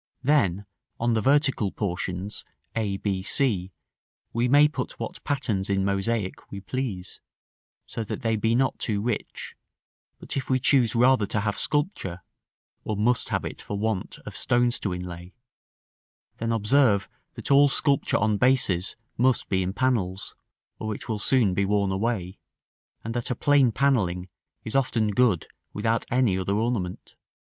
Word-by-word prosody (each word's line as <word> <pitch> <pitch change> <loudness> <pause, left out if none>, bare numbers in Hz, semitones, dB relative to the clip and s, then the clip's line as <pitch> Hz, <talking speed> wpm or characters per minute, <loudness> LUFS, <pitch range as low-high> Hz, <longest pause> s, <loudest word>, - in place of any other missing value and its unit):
Then, 100 - +2 0.3
on 120 0 +1
the 110 - +1
vertical 135 -6 +2
portions, 95 0 -4 0.3
a, 105 -3 -1
b, 95 -2 -2
c, 95 -4 0 0.6
we 120 +2 +1
may 145 +3 +6
put 140 -4 -5
what - - -6
patterns 115 -9 -1
in 95 -1 +1
mosaic 100 +1 -2
we 100 - -5
please, 100 -3 -5 0.6
so 115 - -4
that - - -5
they 115 -1 +1
be 110 +2 +1
not 130 +2 +1
too 105 -3 -1
rich; 115 +1 -4 0.6
but - - -5
if 135 -2 -3
we 130 - +3
choose 125 -4 +3
rather 125 -3 +4
to 105 - 0
have 105 0 -1
sculpture 145 - -1 0.6
(or 110 - -3
must 120 +4 +2
have - - -1
it - - -6
for 100 - -5
want 105 -2 -2
of - - -8
stones 120 0 +1
to 100 - -2
inlay), 90 0 -7 1.0
then 115 0 -2
observe 115 -2 +3 0.3
that - - -3
all 140 +1 +7
sculpture 140 0 +2
on 105 0 +1
bases 105 -8 +2 0.2
must 125 0 +2
be 95 -1 +1
in 90 0 -1
panels, 100 -5 -1 0.5
or 110 -1 -3
it - - -9
will 110 -2 -2
soon 110 -3 +3
be 100 - +1
worn 100 0 +1
away, 95 -2 -2 0.6
and 115 - -4
that 120 -1 -2
a 125 - 0
plain 140 -1 +4
panelling 95 -9 +1 0.4
is 110 - -4
often 115 -5 +1
good 105 -6 +2 0.3
without 115 +2 0
any 120 -7 +2
other 100 +2 -1
ornament. 110 -5 -2
110 Hz, 155 wpm, -26 LUFS, 95-125 Hz, 1.0 s, all